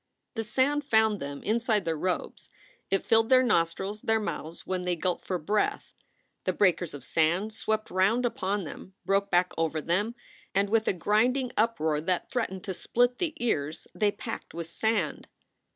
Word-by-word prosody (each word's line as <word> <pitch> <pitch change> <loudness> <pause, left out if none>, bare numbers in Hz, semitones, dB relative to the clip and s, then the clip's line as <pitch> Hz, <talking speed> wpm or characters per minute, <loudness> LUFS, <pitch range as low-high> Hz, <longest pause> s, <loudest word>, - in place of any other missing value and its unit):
The 225 - -2
sand 275 +6 +1
found 220 -4 +3
them 140 -1 -6
inside 220 -3 +1
their 165 -1 0
robes; 180 +4 -3 0.4
it 195 - +1
filled 225 0 +3
their 255 -1 +6
nostrils, 195 -1 0
their 225 0 +2
mouths 165 -4 -5
when 185 -1 -2
they 180 -1 0
gulped 175 +1 -1
for 185 - -1
breath. 205 +6 -1 0.5
The - - 0
breakers 175 -5 +2
of 140 - -9
sand 175 +10 +1
swept 215 0 -2
round 200 +7 +3
upon 205 -3 -1
them, 185 +3 -9
broke 200 0 +2
back 180 0 +2
over 160 -1 0
them, 200 +9 0 0.4
and 200 +1 +2
with 220 -1 +2
a - - +3
grinding 240 +8 +2
uproar 160 -10 +1
that 180 +2 -1
threatened 205 -7 -2
to 195 -2 -3
split 245 +6 +1
the 330 -4 -1
ears 155 -9 -1
they 210 -1 +2
packed 205 - -7
with 170 0 -4
sand. 195 -1 -1
200 Hz, 170 wpm, -28 LUFS, 170-225 Hz, 0.5 s, their